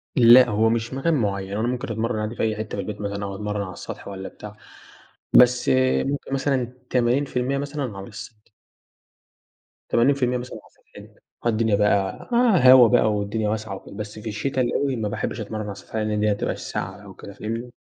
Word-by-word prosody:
لأ، 125 -1 +8
هو 110 +2 +2
مش 115 +2 -1
مكان 135 +5 0
معيّن، 100 -7 -1
هو 105 - -2
أنا 115 - 0
ممكن 125 -1 -3
أتمرَّن 115 0 -2
عادي 110 +2 -3
في - - -2
أي 110 -1 0
حتّة 110 0 -5
في - - -2
البيت 105 -1 -6
مثلًا 100 0 -4
أو 100 -1 -5
أتمرَّن 105 0 -3
على 95 -2 -6
السطح - - -9
والّا 95 -1 -6
بتاع، 105 0 -11 0.8
بس 125 0 +5 0.4
ممكن 140 0 -3
مثلًا 135 -3 -1 0.2
80% 125 +1 0
مثلًا 140 -6 -4
على 95 - -8
السطح. 105 0 -11 1.4
80% 125 0 +2
مثلًا 125 +1 -7
على - - -20 0.4
سطحنا، - - -22 0.3
آه، - - +3
الدنيا 110 -1 +2
بقى 100 - 0 0.4
هوا 125 -3 +9
بقى، 110 0 +3
والدنيا 105 +1 -1
واسعة 110 -2 -3
وكده، 95 - -12
بس 105 +1 -7
في 110 +1 -6
الشتا 130 +5 -2
الأوي 130 +2 0
ما 110 -3 -2
باحبش 110 - -4
أتمرن 110 0 -5
على 100 -1 -6
سطحنا، 110 +2 -5
لأن 105 0 0
هتبقى 105 -1 0
في - - -11
الساقعة 95 +3 -5
أو 100 -2 -12
كده، 100 - -11
فاهمني؟ 115 +4 -5
110 Hz, 190 wpm, -23 LUFS, 105-125 Hz, 1.4 s, هوا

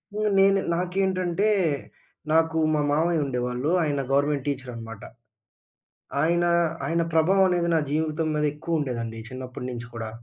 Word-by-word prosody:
హ్మ్. 215 0 +1
నేను 195 0 +5 0.2
నాకేంటంటే. 185 +2 0 0.8
నాకు 160 0 +3 0.2
మా 150 - +2
మామయ్య 160 +1 +2
ఉండేవాళ్ళు. 125 +2 -2
ఆయన 145 -2 0
గవర్నమెంట్ 140 0 +1
టీచర్ 130 -3 -3
అనమాట. 115 -2 -9 1.2
ఆయనా 170 +2 +2 0.4
ఆయన 170 +1 +1
ప్రభావం 190 +4 +4
అనేది 175 -1 +1
నా - - +4
జీవితం 155 +1 0
మీద 150 - 0
ఎక్కువ 160 +1 -2
ఉండేదండి. 115 -5 -3
చిన్నప్పటినుంచి 125 -2 -6
గూడా. 115 -1 -5
155 Hz, 130 wpm, -25 LUFS, 130-175 Hz, 1.2 s, నేను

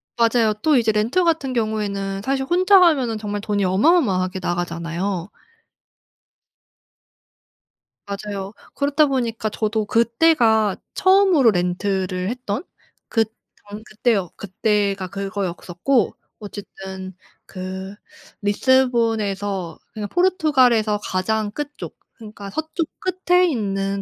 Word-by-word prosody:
맞아요. 230 -2 +3
또 305 -3 +4
이제 225 -2 +3
렌트 225 +12 +1
같은 320 -6 0
경우에는 205 -4 -2
사실 270 0 0
혼자 370 +5 +5
가면은 270 -11 +3
정말 205 -1 -4
돈이 205 -1 -1
어마어마하게 190 - +2
나가잖아요. 175 +1 -3 2.8
맞아요. 200 0 -5 0.2
그렇다 290 +2 +2
보니까 235 -5 -1
저도 215 +1 -1
그때가 230 - +3 0.2
처음으로 375 - +5
렌트를 185 0 -1
했던 245 +1 -4 0.5
그 225 -1 +2 0.4
전 210 +1 -8
그때여 215 -5 0
그때가 200 -1 -1
그거였었고 195 +3 -1 0.2
어쨌든 190 -2 -8 0.3
그 190 +1 -7 0.5
리스본에서 205 -6 +1 0.2
그니까 210 -1 -4
포르투갈에서 260 - +3
가장 210 +3 -1
끝 295 +5 -5
쪽 - - -8 0.2
그니까 210 -3 -10
서쪽 315 - -3 0.4
끝에 360 +1 +5
있는 195 - -1
215 Hz, 255 characters per minute, -21 LUFS, 195-260 Hz, 2.8 s, 혼자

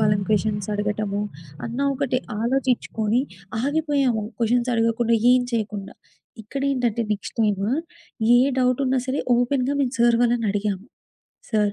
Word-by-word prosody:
వాళ్ళని 205 -2 +2
క్వెషన్సడగటము 205 0 -1 0.5
అన్న 235 +3 -5 0.2
ఒకటి 260 -2 0 0.2
ఆలోచిచ్చుకోని 240 -2 +1 0.4
ఆగిపోయాము 280 -6 +1 0.2
క్వెషన్సడగకుండా, 230 -1 +2 0.2
ఏం 255 - +5
చెయకుండా. 205 -3 -3 0.5
ఇక్కడేంటంటే, 250 -2 -1
నెక్స్ట్ 205 - -6
టైమ్ 205 -3 +1 0.7
ఏ - - +6 0.2
డౌటున్నా 255 +1 +2
సరే 265 +2 0 0.2
ఓపెన్‌గా 255 +2 +1
మేం 260 - +1
సార్ 235 0 +5
వాళ్ళనడిగాము. 210 -4 0 0.7
"సార్, 210 -1 +2
230 Hz, 100 wpm, -23 LUFS, 210-255 Hz, 0.7 s, ఏ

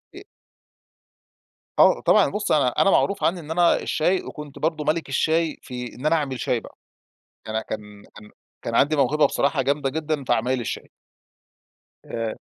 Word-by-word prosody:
ا - - -8 1.6
آه، - - +6
طبعًا، - - +4
بُص 210 0 -2
أنا 145 -4 +4
أنا 195 - +4
معروف 200 +1 +2
عني 175 +2 +1
إن 155 -1 -9
أنا 170 +1 +3
الشاي، 180 +4 0
وكنت 150 -2 -9
برضو 155 -1 -1
ملِك 155 0 -1
الشاي 160 +3 +1
في 125 -2 -7
إن 130 - -9
أنا 165 - +4
أعمل 135 -5 -2
شاي 120 - 0
بقى. - - -15 0.7
أنا 110 0 -1
كان 105 -1 -8
كان 105 0 -13 0.3
كان 115 - -4
عندي 150 +5 +3
موهبة 145 +2 +3
بصراحة 140 0 0
جامدة 140 0 0
جدًا 155 -2 -2
في - - +1
عمايل 125 +3 +1
الشاي. 120 - -5 1.2
آآ 115 -1 -4
145 Hz, 165 wpm, -23 LUFS, 125-160 Hz, 1.6 s, آه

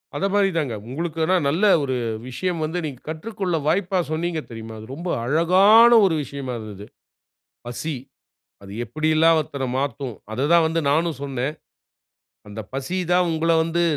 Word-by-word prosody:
அத 195 - -1
மாரி 200 -1 +3
தாங்க. 145 -7 -1 0.2
உங்களுக்கு 165 +4 -4
ஆனா 185 +3 +2
நல்ல 165 +8 -1 0.2
ஒரு 130 -2 -1 0.3
விஷயம் 175 +7 -3
வந்து, 160 +3 -3
நீங்க 135 -5 -6
கற்றுக்கொள்ள 185 +2 -3
வாய்ப்பா 185 +3 +1
சொன்னீங்க 165 0 -2
தெரியுமா! 115 -1 -8
அது 110 - -11
ரொம்ப 175 +4 -5
அழகான 185 - +6
ஒரு 175 -4 +2
விஷயமா 135 -1 -6
இருந்தது. 105 -2 -9 0.8
"பசி" 120 +6 -4 0.7
அது 100 0 -11
எப்டியெல்லாம் 155 +3 +3
ஒருத்தர 140 -3 -4
மாத்தும், 140 -3 -3 0.2
அத 130 +5 0
தான் 170 -1 +6
வந்து 165 +1 0
நானும் 160 +1 +1
சொன்னேன். 135 +1 -3 0.9
அந்த 105 +2 -7
பசி 140 +8 -3
தான் 180 0 +3
உங்கள 165 +1 +1
வந்து 165 +1 0
160 Hz, 150 wpm, -22 LUFS, 135-175 Hz, 0.9 s, அழகான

